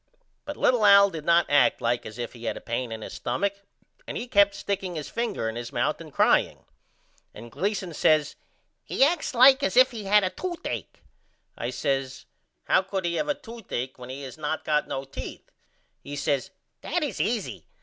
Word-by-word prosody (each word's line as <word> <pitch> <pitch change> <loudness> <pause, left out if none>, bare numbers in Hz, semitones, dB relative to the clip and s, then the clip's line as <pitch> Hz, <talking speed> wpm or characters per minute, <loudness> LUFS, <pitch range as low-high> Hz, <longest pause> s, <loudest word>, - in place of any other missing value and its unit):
But 295 0 -6
little 245 -3 +3
Al 200 -1 +7
did 160 -3 -7
not 170 0 +4
act 145 -1 +4
like 120 +1 -1
as 110 - -10
if 120 -1 -5
he 120 -1 -10
had - - -2
a - - -6
pane 120 0 -3
in 110 -1 -6
his - - -8
stumach 200 +11 -2 0.5
and - - -4
he 245 - -5
kept 200 -4 +4
sticking 195 -3 -3
his 150 -3 -6
finger 230 - -2
in 110 - -4
his 120 0 -6
mouth - - -1
and - - -11
crying. - - +2 0.7
And 115 +2 -10
Gleason 190 +3 -2
says 155 -1 +2 0.5
He - - +1
acts 305 -2 +1
like 265 +3 +7
as 280 - 0
if 255 +1 +7
he 220 -4 -7
had 205 +1 +5
a 185 - 0
toothacke. 350 - -5 0.5
I - - -4
says 135 -1 -2 0.4
How - - +3
could 190 -1 -4
he 170 - 0
have 300 - -1
a 295 - +1
toothacke 195 - -6
when 125 0 -9
he 135 +2 -7
has 135 +3 -9
not 155 +1 -3
got 150 -1 +1
no 135 - -4
teeth? 135 - -9 0.5
He 145 - -7
says 140 -2 -1 0.3
That - - -1
is - - -2
easy. - - -2
175 Hz, 200 wpm, -26 LUFS, 135-210 Hz, 0.7 s, Al